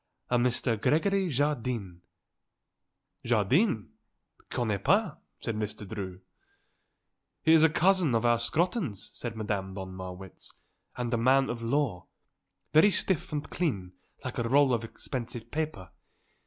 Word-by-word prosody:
"A 125 - +4
Mr. 120 -2 0
Gregory 190 +4 +2
Jardine." 125 - -1 1.2
"Jardine? 120 - +2 0.6
Connais 110 -5 -1
pas," 200 +9 +2 0.2
said 115 - -2
Mr. 105 -1 -4
Drew. 95 -3 -6 1.2
"He 160 - +5
is 160 - +7
a 160 - +6
cousin 175 -4 +3
of 115 +1 +1
our 120 -1 +4
Scrotton's," 160 - -1
said 120 -2 -5
Madame 100 -3 -3
von 95 -1 -6
Marwitz, 95 0 -8 0.5
"and 125 0 -2
a - - +3
man 135 +3 +3
of 120 -1 -5
law. 115 -6 -1 0.7
Very 160 +7 +7
stiff 185 -3 +1
and 150 0 -3
clean 100 - -1 0.3
like - - -4
a 115 0 -1
roll 140 0 +5
of 115 -1 0
expensive 120 0 -6
paper. 150 - -3
120 Hz, 130 wpm, -29 LUFS, 105-150 Hz, 1.2 s, is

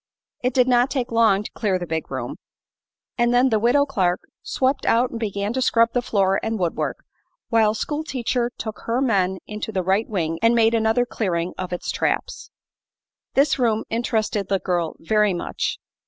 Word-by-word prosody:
It 250 0 -1
did 250 -1 +4
not 245 +1 +3
take 255 -2 -2
long 220 -3 +3
to - - -8
clear 200 -5 0
the 175 - -5
big 160 -1 -3
room, - - -5 0.8
and 240 0 +3
then 250 +2 +4
the 220 -3 +2
Widow 245 +6 +3
Clark 190 -10 0 0.2
swept 265 +1 0
out 240 +2 +3
and 230 - -5
began 205 -1 -2
to 260 - -1
scrub 230 -2 +4
the 245 - +1
floor 195 -4 +1
and 225 0 -2
woodwork, 175 -4 -2 0.4
while 220 -2 +3
school 295 +8 -2
teacher 250 -3 -1
took 220 -2 -6
her 235 +2 0
men 195 -8 +1
into 210 +1 -5
the 190 -3 -1
right 195 +5 +1
wing 165 -6 -2
and 230 +1 +4
made 225 -1 +4
another 225 +2 +2
clearing 180 -7 -2
of 185 -1 -5
its 180 - -3
traps. - - -2 0.9
This 275 0 +3
room 225 -3 +2
interested 220 -3 -1
the 195 - +2
girl 175 -3 -2
very 210 +2 +1
much. 175 - -3
220 Hz, 185 wpm, -22 LUFS, 195-245 Hz, 0.9 s, did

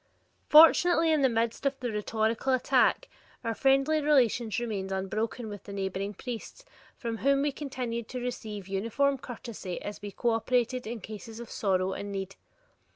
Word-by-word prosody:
Fortunately 330 +1 +7
in 310 -2 +3
the 265 - +4
midst 230 +1 -1
of 275 -1 0
the 245 -2 -3
rhetorical 220 +4 0
attack, 260 - +3 0.4
our 230 -1 -1
friendly 275 +5 +3
relations 245 -7 +2
remained 210 -5 -3
unbroken 215 +5 -2
with 205 -2 -8
the 200 - -8
neighboring 195 +1 -3
priests 250 - -7 0.3
from 230 -2 -4
whom 275 0 +3
we 290 - +1
continued 250 -5 -4
to 255 - -5
receive 220 -5 -5
uniform 230 +8 0
courtesy 225 -7 -7
as 205 +1 -7
we 205 - -5
cooperated 240 +3 0
in 230 -1 -5
cases 220 +2 -9
of 235 - -9
sorrow 190 -2 0
and 200 +1 -5
need. 195 -1 -5
230 Hz, 160 wpm, -29 LUFS, 205-265 Hz, 0.4 s, Fortunately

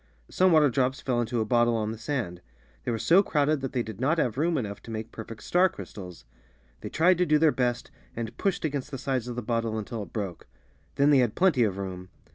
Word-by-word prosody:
Some 185 0 +4
water 150 -4 +5
drops 130 +3 0
fell 125 -4 0
into 115 0 -1
a - - 0
bottle 120 +1 +3
on 110 -1 -1
the 110 - -6
sand; 115 -10 -3 0.4
they - - -2
were 115 - -1
so 175 - +5
crowded 150 -5 +1
that 135 - -3
they 125 -2 0
did 110 0 -8
not 150 +6 +2
have 120 -8 0
room 160 +4 +1
enough 105 -6 -4
to - - -13
make 110 0 -5
perfect 115 0 -9
star 180 +2 +3
crys - - -10
tals. 90 - -9 0.6
They - - -6
tried 175 +2 +3
to 180 - +4
do 150 - +4
their 155 0 +4
best, 125 -2 -1 0.2
and 115 0 -5
pushed 195 -4 -1
against 145 -2 -3
the 135 - -5
sfdes 130 -2 -2
of 120 - -5
the 125 - -4
bottle 115 -1 -1
until 110 +1 -4
it 100 - -9
broke. 100 -6 -5 0.5
Then 140 +1 +4
they 140 - +6
had 120 -4 +1
plenty 175 -9 +3
of 100 -5 +1
room. 95 -1 -6
120 Hz, 245 wpm, -27 LUFS, 110-150 Hz, 0.6 s, they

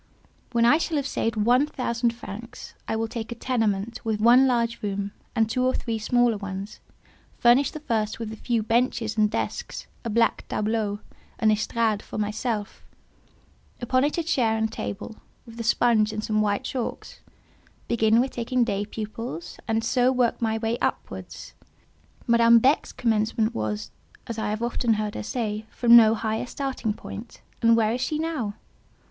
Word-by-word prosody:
When 235 -1 +3
I 295 +7 +5
shall 325 -2 -1
have 280 - -1
saved 230 -4 -1
one 245 +6 +3
thousand 235 -4 -1
francs, 230 0 -9
I - - -1
will 225 0 -1
take 230 0 -6
a - - -4
tenement 225 -3 -1
with 220 -2 -1
one 245 +4 +6
large 235 -2 0
room, 200 -1 -3 0.2
and 225 -2 +3
two 255 +3 0
or 255 0 +2
three 225 -2 -2
smaller 240 0 +2
ones, 200 0 -6 0.6
furnish 245 +4 +5
the 310 - -8
first 220 -7 -1
with 225 -1 -5
a - - -6
few 230 0 -1
benches 225 -1 0
and 215 -1 +3
desks, 225 - -4 0.2
a 230 - -3
black 230 +1 +1
tableau, 210 -1 -1 0.4
an 220 -1 +3
estrade 215 0 0
for - - -8
myself; 210 0 -3 1.0
upon 255 +2 +1
it 295 +3 0
a 335 - 0
chair 245 -9 +1
and 220 0 0
table, 215 0 -6 0.3
with 230 0 -12
a - - -2
sponge 225 -2 +3
and 215 0 -4
some 215 -1 +1
white 205 -1 0
chalks; 255 -3 -5 0.7
begin 225 -1 +3
with 260 +2 +1
taking 245 +1 0
day 205 -3 -1
pupils, 215 -6 -6
and 225 0 0
so 250 +2 +3
work 250 -2 +1
my 220 -1 +1
way 225 +1 -1
upwards. - - -4 0.7
Madame 235 -1 +6
Beck's 265 +6 +3
commencement 220 -1 0
was—as 110 - -6
I 215 -1 -1
have 215 +2 -2
often 235 -1 +1
heard 210 -1 -2
her - - -4
say—from 220 0 +2
no 225 -1 +8
higher 220 +2 -2
starting 255 -6 -3
point, 225 +2 -9 0.2
and 230 -1 +5
where 220 -1 +2
is 245 - -2
she 300 +4 -1
now? 305 -10 -2
225 Hz, 170 wpm, -25 LUFS, 215-240 Hz, 1.0 s, no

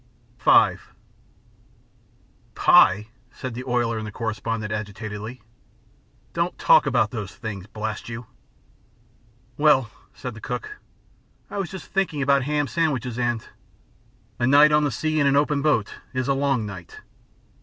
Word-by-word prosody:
V - - +5 1.8
"Pie," 105 +3 +5 0.2
said 130 -2 -6
the 125 +2 -6
oiler 120 -3 0
and 110 - -5
the - - -7
correspondent, 110 -1 -3
agitatedly. 105 +2 -6 0.9
"Don't 170 +1 -1
talk - - +5
about 120 -5 +2
those 105 -4 -6
things, 105 -5 -7
blast 110 0 -5
you!" 115 +1 -6 1.3
"Well," 140 -6 +4 0.2
said 125 -3 -6
the 115 - -12
cook, 125 - -5 0.7
"I 200 - -3
was 190 -3 -2
just 190 -2 -8
thinking 180 -7 -1
about 140 -1 +3
ham 145 0 0
sandwiches, 130 -6 -1
and 120 -2 -1 0.5
" - - -35
A 120 - +2
night 145 +3 +7
on 150 0 +4
the - - +1
sea 155 +7 -1
in 140 - +3
an 140 - +3
open 145 0 +2
boat 125 -9 +1 0.2
is 130 -1 -1
a 140 - +3
long 135 -4 0
night. 95 -4 -9
125 Hz, 145 wpm, -24 LUFS, 110-145 Hz, 1.8 s, night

